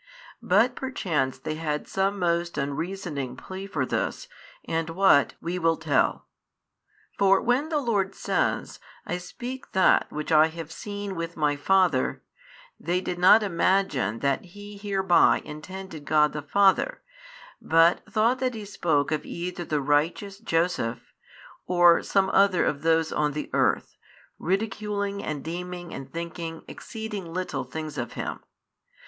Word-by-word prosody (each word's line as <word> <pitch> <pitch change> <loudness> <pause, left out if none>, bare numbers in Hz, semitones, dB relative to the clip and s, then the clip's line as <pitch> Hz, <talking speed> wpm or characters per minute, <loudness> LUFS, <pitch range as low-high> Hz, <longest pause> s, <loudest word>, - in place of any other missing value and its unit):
But 225 +7 +3
perchance 160 - -1
they 145 +4 -4
had 155 -1 -3
some 195 +1 0
most 170 -2 0
unreasoning 145 -2 -3
plea 190 +5 -7
for 200 - -1
this, - - -2 0.4
and 165 0 -2
what, 170 -4 +4
we 175 +2 -3
will 165 -1 +2
tell. 160 -3 +1 0.9
For 195 -1 +5
when 255 +6 +1
the 315 - 0
Lord 205 -8 0
says, - - -1 0.3
I 175 - -3
speak 245 +8 -8
that 190 -1 +4
which 150 +2 -4
I 155 0 +6
have 160 -1 -8
seen 205 +2 -5
with 165 0 -5
My 150 -2 +2
Father, 175 -2 +2 0.6
they 175 +3 0
did 180 -1 -4
not 200 +5 +7
imagine 170 - +1
that 140 -1 +1
He 205 +3 -11
hereby 195 -3 +3
intended 160 0 -8
God 150 0 +3
the 150 - -4
Father, 195 - +2 0.6
but 165 +2 +4
thought 230 +3 +2
that 255 -2 -1
He 215 -2 -6
spoke 160 -8 0
of 155 -1 -1
either 175 +1 -5
the 150 -2 -1
righteous 160 +8 0
Joseph, 165 - -1 0.5
or 175 -1 +5
some 195 -1 +1
other 195 -2 +4
of 140 - -1
those 160 0 +2
on 150 -1 0
the 150 - -5
earth, - - +1 0.4
ridiculing 200 +1 -2
and 145 -3 -4
deeming 175 +1 -6
and 135 - -8
thinking 165 -1 -6
exceeding 210 -6 -7
little 165 -7 -3
things 150 +2 -6
of 120 -1 -4
Him. - - -4
175 Hz, 140 wpm, -26 LUFS, 155-195 Hz, 0.9 s, not